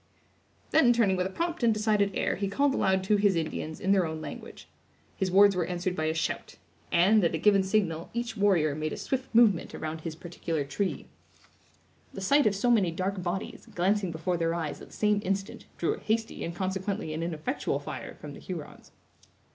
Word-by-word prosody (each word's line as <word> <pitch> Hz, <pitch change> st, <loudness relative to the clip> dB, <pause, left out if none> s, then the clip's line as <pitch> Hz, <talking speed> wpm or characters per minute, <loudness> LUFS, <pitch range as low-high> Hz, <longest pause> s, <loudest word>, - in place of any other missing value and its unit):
Then, 255 Hz, -6 st, +5 dB
turning 220 Hz, -5 st, +3 dB
with 185 Hz, 0 st, 0 dB
a -, -, -7 dB
prompt 335 Hz, -, -3 dB
and 235 Hz, -1 st, +4 dB
decided 210 Hz, -2 st, +1 dB
air, -, -, 0 dB
he 200 Hz, +1 st, -2 dB
called 280 Hz, +7 st, +2 dB
aloud 190 Hz, -6 st, +2 dB
to 210 Hz, +2 st, +3 dB
his 200 Hz, -2 st, +3 dB
Indians, 160 Hz, -1 st, -3 dB
in 190 Hz, -, 0 dB
their 190 Hz, -4 st, +3 dB
own 160 Hz, 0 st, -5 dB
language. -, -, -9 dB, 0.5 s
His 190 Hz, -, -1 dB
words 200 Hz, +1 st, +6 dB
were 180 Hz, -2 st, 0 dB
answered 180 Hz, 0 st, -2 dB
by 155 Hz, -, -1 dB
a 160 Hz, -, +1 dB
shout; 160 Hz, -, -3 dB, 0.4 s
and, 195 Hz, +5 st, +5 dB
at 165 Hz, -1 st, +2 dB
a -, -, 0 dB
given 200 Hz, +3 st, +4 dB
signal, 190 Hz, -4 st, 0 dB
each 235 Hz, -1 st, -3 dB
warrior 190 Hz, -8 st, +3 dB
made 155 Hz, +1 st, -3 dB
a -, -, -5 dB
swift 265 Hz, -1 st, -2 dB
movement 220 Hz, -7 st, +4 dB
around 155 Hz, 0 st, -5 dB
his 160 Hz, -1 st, -5 dB
particular 165 Hz, -2 st, -3 dB
tree. 150 Hz, +2 st, -3 dB, 1.1 s
The 195 Hz, -, -6 dB
sight 280 Hz, +8 st, +4 dB
of 200 Hz, -, +1 dB
so 240 Hz, +5 st, +2 dB
many 205 Hz, -7 st, +4 dB
dark 185 Hz, +3 st, -2 dB
bodies, 180 Hz, +6 st, -4 dB
glancing 190 Hz, +1 st, +1 dB
before 170 Hz, +2 st, -2 dB
their 165 Hz, 0 st, 0 dB
eyes 160 Hz, -4 st, -4 dB
at -, -, -10 dB
the -, -, -17 dB
same 210 Hz, -1 st, +2 dB
instant, 195 Hz, +1 st, -3 dB
drew 170 Hz, -, +1 dB
a -, -, -8 dB
hasty 225 Hz, +1 st, -2 dB
and 170 Hz, -, -4 dB
consequently 190 Hz, -1 st, -2 dB
an 160 Hz, -, -3 dB
ineffectual 170 Hz, -, -2 dB
fire -, -, -7 dB
from -, -, -9 dB
the -, -, -10 dB
Hurons. -, -, -8 dB
190 Hz, 205 wpm, -28 LUFS, 165-210 Hz, 1.1 s, words